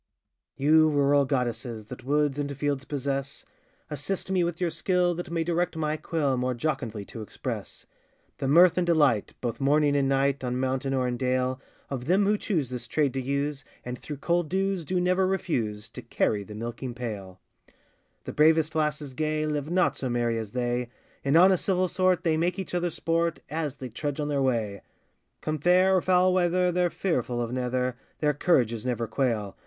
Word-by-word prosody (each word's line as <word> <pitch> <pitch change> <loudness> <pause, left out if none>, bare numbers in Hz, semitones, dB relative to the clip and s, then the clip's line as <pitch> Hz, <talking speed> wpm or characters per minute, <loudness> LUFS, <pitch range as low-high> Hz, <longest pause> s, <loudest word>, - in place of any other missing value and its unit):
] - - -56
YOU 155 +3 +5
rural 145 -1 +3
goddesses, 120 -4 -2
That 125 +3 -10
woods 145 +1 +1
and 140 -1 -3
fields 140 -1 -1
possess, 140 -1 -3 0.5
Assist 165 +7 -3
me 185 -2 +2
with 170 -1 -2
your 175 -2 0
skill, 180 +2 +1
that 175 +1 -6
may 165 -1 -1
direct 175 +1 0
my 155 -1 0
quill, 150 -4 -1
More 125 0 -1
jocundly 115 -6 -3
to 115 - -8
express, 105 - -6 0.5
The 135 - -1
mirth 175 +5 +6
and 175 - 0
delight, 145 -11 +2
both 120 +1 -3
morning 145 +1 +3
and 140 -1 +2
night, 135 0 +1
On 125 0 -1
mountain 130 +1 -1
or 130 -1 +1
in 120 -1 -2
dale, 130 +1 0 0.3
Of 130 -3 -4
them 190 +6 +3
who 210 +2 +3
choose 160 - -1
this 125 -1 -5
trade 145 0 +1
to 135 - -2
use, 140 +1 -2 0.2
And, 125 0 -5
through 150 - -7
cold 170 +2 0
dews, 190 -2 -1
do 180 +4 0
never 185 +1 +2
refuse 120 - -2
To - - -9
carry 105 - 0
the 105 +1 -10
milking 120 +3 -5
pail. 100 -7 -6 0.8
The - - -6
bravest 155 0 +4
lasses 150 -2 -1
gay, 155 +2 -1
Live 150 -1 -2
not 180 +1 +2
so 130 - -3
merry 120 -1 0
as 110 -1 -7
they; 120 -1 -1 0.3
In 140 +2 +2
honest 185 +1 +5
civil 185 -1 +2
sort 185 -1 +1
they 160 -2 +2
make 175 +3 0
each 190 -2 -5
other 175 0 0
sport, 165 0 -1
As 155 -3 -2
they 130 -2 -7
trudge 145 +5 -4
on 150 0 -1
their 140 -2 0
way; 110 -7 0 0.6
Come 155 0 -2
fair 185 +4 +4
or 185 - +3
foul 185 0 +3
weather, 180 0 +2
they're 175 0 +2
fearful 125 -10 -1
of 120 -1 -2
neither, 125 0 -1 0.2
Their 150 -1 +1
courages 120 -8 +1
never 120 -2 -1
quail. 110 -4 -1
145 Hz, 190 wpm, -27 LUFS, 125-170 Hz, 0.8 s, mirth